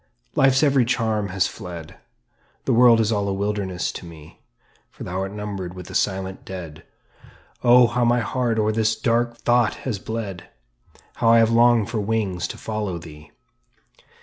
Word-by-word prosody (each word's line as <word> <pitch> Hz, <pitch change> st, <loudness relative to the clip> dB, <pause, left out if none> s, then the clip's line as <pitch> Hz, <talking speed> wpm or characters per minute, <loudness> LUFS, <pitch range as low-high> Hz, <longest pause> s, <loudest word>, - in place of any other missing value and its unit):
Life's 135 Hz, +1 st, +3 dB
every 140 Hz, -3 st, +4 dB
charm 110 Hz, -4 st, 0 dB
has 95 Hz, 0 st, +1 dB
fled, 90 Hz, -7 st, -8 dB, 0.7 s
The -, -, +1 dB
world 120 Hz, -1 st, +6 dB
is 110 Hz, 0 st, +1 dB
all 100 Hz, -2 st, 0 dB
a 100 Hz, -, -1 dB
wilderness 100 Hz, -2 st, -2 dB
to -, -, -9 dB
me; 80 Hz, -3 st, -13 dB, 0.5 s
"For -, -, -11 dB
thou 90 Hz, +1 st, -4 dB
art 95 Hz, 0 st, -3 dB
numbered 100 Hz, -3 st, -6 dB
with 90 Hz, -1 st, -9 dB
the -, -, -10 dB
silent 95 Hz, -1 st, -2 dB
dead." 85 Hz, -5 st, -8 dB, 0.8 s
Oh, 125 Hz, 0 st, +7 dB
how 120 Hz, +1 st, 0 dB
my 120 Hz, +1 st, +3 dB
heart 120 Hz, +1 st, -1 dB
o'er 110 Hz, 0 st, +2 dB
this 110 Hz, 0 st, +1 dB
dark 120 Hz, 0 st, 0 dB
thought 120 Hz, -1 st, +2 dB
has 115 Hz, -7 st, -2 dB
bled! 105 Hz, -4 st, -5 dB, 0.7 s
How 115 Hz, -, +2 dB
I 115 Hz, -, +7 dB
have 115 Hz, 0 st, +4 dB
longed 115 Hz, -2 st, +4 dB
for 115 Hz, -, -1 dB
wings 100 Hz, -4 st, -1 dB
to -, -, -8 dB
follow 105 Hz, -5 st, -4 dB
thee! 75 Hz, -3 st, -12 dB
105 Hz, 170 wpm, -22 LUFS, 95-115 Hz, 0.8 s, Oh